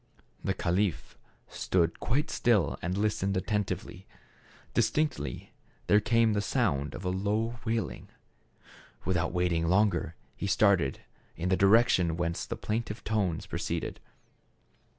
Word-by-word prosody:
The - - 0
caliph 90 -6 -1 0.3
stood 85 -3 0
quite 150 +6 0
still 95 - +2
and 90 +3 -2
listened 100 -2 0
atten 105 +2 0
tively. - - -6 0.7
Distinctly 120 +7 -1 0.3
there 105 - +5
came 115 0 +3
the 100 - +1
sound 95 - 0
of 90 - -7
a 90 - +1
low 105 +5 -1
wailing. 110 - -2 1.0
Without 90 -3 0
waiting 85 -2 +1
longer 95 -3 +2 0.2
he 100 - -3
started 95 -9 +3 0.3
in 85 +3 -2
the 95 - +4
direction 95 -5 +4
whence 85 -1 -2
the - - -3
plaintive 110 0 -3
tones 100 -7 -1
pro - - -5
ceeded. - - -3
100 Hz, 130 wpm, -29 LUFS, 85-110 Hz, 1.0 s, there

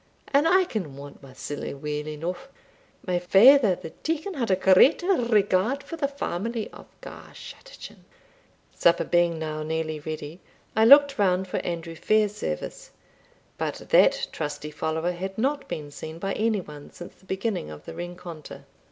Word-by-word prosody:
And 290 +3 +3
I 375 +3 +5
can 185 - -5
want 140 0 -11
my 135 -2 -13
siller 140 +1 -6
weel 150 +1 -4
eneugh. 170 - -5 0.6
My 180 -2 0
father 205 +4 +6
the 160 - -9
deacon 325 +5 -2
had 250 - -2
a 190 - +4
great 190 - +5
regard 235 - +2
for 330 - -7
the 300 -4 -1
family 230 -4 -4
of - - -13
Garschattachin." - - -11 0.7
Supper 170 - +3
being 175 -1 +2
now 155 -1 -4
nearly 155 0 -3
ready, 155 +2 -7 0.4
I 220 - +4
looked 280 +1 +7
round 190 -1 +2
for - - -3
Andrew 170 -1 -4
Fairservice; 215 - -1 0.7
but - - -2
that - - +4
trusty 150 0 -5
follower 160 +3 -2
had 190 +2 -6
not 275 +5 -1
been 145 -2 -6
seen 160 +2 -8
by 195 +3 -3
any 215 -2 0
one 150 -3 -11
since 175 - -11
the - - -25
beginning 190 - -3
of 75 0 -11
the - - -8
rencontre. 175 -3 -9
185 Hz, 155 wpm, -25 LUFS, 160-250 Hz, 0.7 s, looked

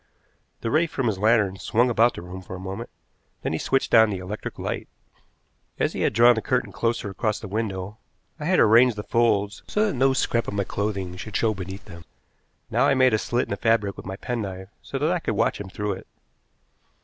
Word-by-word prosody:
The 115 - -2
ray 165 +4 +3
from 135 -4 -3
his 105 -5 0
lantern 105 -3 +3
swung 115 +7 +2
about 115 +1 +3
the - - -7
room 90 +1 -8
for 95 0 -8
a - - -8
moment, 95 +1 -6 0.5
then - - -1
he 80 - -1
switched 135 - 0
on 110 -1 +7
the 100 - -2
electric 95 +4 -6
light. - - -4 0.9
As - - 0
he - - -3
had - - +2
drawn 120 +1 +7
the 110 - -2
curtain 120 -4 0
closer 115 0 -1
across 110 +2 -1
the 110 - -7
window, 100 -1 -4 0.4
I 150 - -5
had 180 +2 +3
arranged 115 +2 +6
the 105 - -5
folds 105 -4 +1
so 210 +1 +1
that 210 - 0
no 135 +1 +3
scrap 115 -3 0
of - - -4
my 100 - +1
clothing 95 -3 -3
should 105 +1 -4
show 110 -2 +2
beneath 95 +1 -7
them. 85 -4 -11 0.7
Now - - +3
I 140 - +3
made 130 -2 +4
a 110 - +3
slit 120 +3 0
in - - -12
the - - -1
fabric 110 -4 +1
with - - -10
my 95 - -4
penknife 95 -5 -5
so 135 - -5
that 150 +5 +1
I 180 - +1
could - - -2
watch - - +1
him 100 - -7
through 105 +2 -3
it. 95 - -10
110 Hz, 225 wpm, -24 LUFS, 95-120 Hz, 0.9 s, on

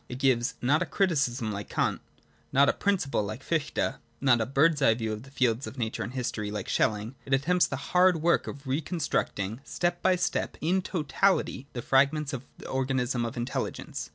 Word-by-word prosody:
It 125 - -5
gives 130 -2 +2
not 145 +6 +3
a 175 - 0
criticism, 135 - +1
like 100 0 -5
Kant; - - 0 0.5
not 140 +1 +5
a - - +4
principle, 185 - 0
like 110 +5 -5
Fichte; 150 -4 -1 0.2
not 125 -4 +4
a 110 - -1
bird's 145 +3 +3
eye 115 -5 +5
view 110 -2 -2
of 105 - -6
the 135 - -13
fields 130 -2 0
of 135 - -9
nature 115 -2 -2
and 120 - -4
history, 120 -5 -2
like 105 -2 -4
Schelling; 110 +2 0
it 135 +1 +2
attempts 175 +7 +2
the - - -3
hard 180 -1 +3
work 170 0 +3
of 140 +1 -7
re 135 +4 0
con 175 +4 -5
structing, 110 - -1
step 175 +3 -1
by 185 -1 +4
step, 175 -1 -1
into 180 0 0
totality 150 -4 +1
the 120 - -5
fragments 140 +2 +2
of 130 -1 -5
the - - -10
organism 130 -2 0
of 115 - -5
intelligence. 120 +2 -4
135 Hz, 200 wpm, -28 LUFS, 120-160 Hz, 0.5 s, not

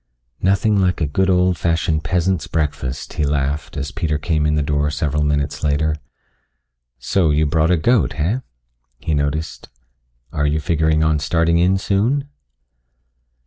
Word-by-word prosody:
"Nothing 100 +2 +2
like 90 -1 +1
a 80 - +1
good 95 +7 0
old 90 -2 +2
fashioned 80 -2 0
peasant's 90 +3 0
breakfast," 70 -4 -3
he - - -1
laughed 70 +1 -1
as 70 +1 -3
Peter 80 -3 -1
came 75 0 0
in 75 - +1
the 75 - +1
door 75 0 0
several 75 0 -1
minutes 75 +1 -1
later. 75 +1 +1 1.0
"So, 90 -5 +1
you 75 +1 +2
brought 80 +2 +1
a 90 - +3
goat, 95 - +2
heh?" 95 +12 -1 0.6
he 80 - -3
noticed. 75 +2 -2 0.6
"Are 75 -1 0
you 75 +2 0
figuring 80 0 +1
on 80 -1 +2
starting 85 +3 +1
in 90 +2 +3
soon?" 115 +9 0
80 Hz, 150 wpm, -19 LUFS, 75-90 Hz, 1.0 s, a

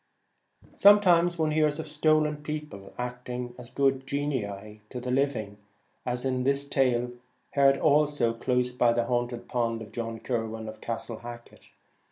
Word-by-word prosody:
Sometimes 175 -4 +6
one 155 -1 +1
hears 150 -1 +2
of 160 - -5
stolen 150 0 +2
people 150 -10 -7
acting 125 0 -5
as 120 -1 -10
good 135 -1 +1
genii 110 -8 -3
to 125 - -5
the 125 +1 -4
living, 125 -7 0 0.5
as 125 +1 -2
in 130 -1 0
this 140 +1 +2
tale, 125 -3 +1 0.4
heard 135 -1 +4
also 145 -5 +3
close 125 +1 0
by 120 -1 +3
the 120 0 +1
haunted 120 0 -2
pond, 115 -2 -1
of 105 - -13
John 115 0 -4
Kirwan 115 -2 -3
of 110 0 -9
Castle 115 0 -4
Hacket. 120 0 -11
125 Hz, 150 wpm, -28 LUFS, 115-145 Hz, 0.5 s, Sometimes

